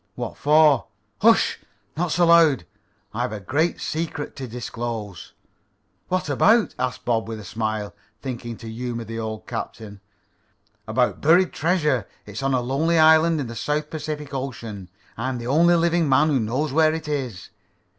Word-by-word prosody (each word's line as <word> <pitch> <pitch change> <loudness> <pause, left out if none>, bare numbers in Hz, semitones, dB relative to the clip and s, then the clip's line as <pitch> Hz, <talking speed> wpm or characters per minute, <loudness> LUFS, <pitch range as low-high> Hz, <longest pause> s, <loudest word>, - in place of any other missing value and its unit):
"What - - -5
for?" 150 -3 +4 0.3
"Hush! - - +4 0.4
Not 175 0 -1
so 175 +2 +3
loud. 165 - +5 0.5
I've 120 +3 -2
a 110 - -5
great 155 - 0
secret 155 -2 -4
to 130 - -5
disclose." 115 -5 -6 0.7
"What 185 -1 -1
about?" 210 - +3
asked 125 0 -3
Bob 115 -2 0
with 110 -1 -5
a - - -9
smile, 110 0 -3 0.3
thinking 120 -3 -6
to 115 - -10
humor 120 +1 -4
the 115 +1 -6
old 110 -1 -5
captain. 110 -3 -7 0.9
"About - - 0
buried 170 +4 +4
treasure. 150 - +1 0.2
It's 105 +3 -7
on 135 -1 +1
a 125 - +1
lonely 145 +7 +1
island 160 +1 +5
in - - -3
the 115 0 -7
Southern 150 +5 -2
Pacific 150 -2 -5
Ocean. 115 -8 -6 0.3
I'm 125 +3 -2
the 120 - -7
only 165 +7 +4
living 170 -2 +2
man 150 +4 +4
who 140 -3 +2
knows 130 +6 -1
where 155 0 +4
it 160 -1 -6
is. 130 -10 -4
135 Hz, 160 wpm, -23 LUFS, 115-155 Hz, 0.9 s, loud